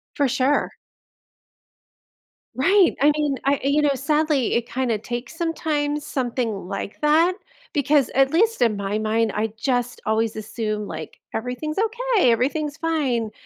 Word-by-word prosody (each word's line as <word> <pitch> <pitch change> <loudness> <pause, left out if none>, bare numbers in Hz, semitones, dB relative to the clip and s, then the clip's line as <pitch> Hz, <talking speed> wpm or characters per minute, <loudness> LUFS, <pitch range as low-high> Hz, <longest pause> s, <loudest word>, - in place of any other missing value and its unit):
For 285 -2 +2
sure. 265 +3 +1 1.8
Right! 380 +7 +4
I 295 - +6
mean, 290 -3 0
I 280 0 +2
you 280 +2 +2
know, 285 -2 +2
sadly 300 -1 +1
it 235 0 0
kinda 240 -3 -1
takes, 240 +5 -6
sometimes, 300 -3 -1
something 235 -7 -2
like 200 +4 -6
that, 320 +4 +4 0.4
because- 285 -2 +2
at 270 +1 +4
least 440 - +2
in 225 -4 +3
my 200 +1 -2
mind- 220 0 +1
I 215 +1 +1
just 245 0 -1
always 220 0 0
assume, 215 -1 -3
like, 160 -1 -8
"Everything's 250 - -3
okay, 450 - +2
everything's 285 +5 0
fine," 275 -10 -1
270 Hz, 140 wpm, -23 LUFS, 225-300 Hz, 1.8 s, I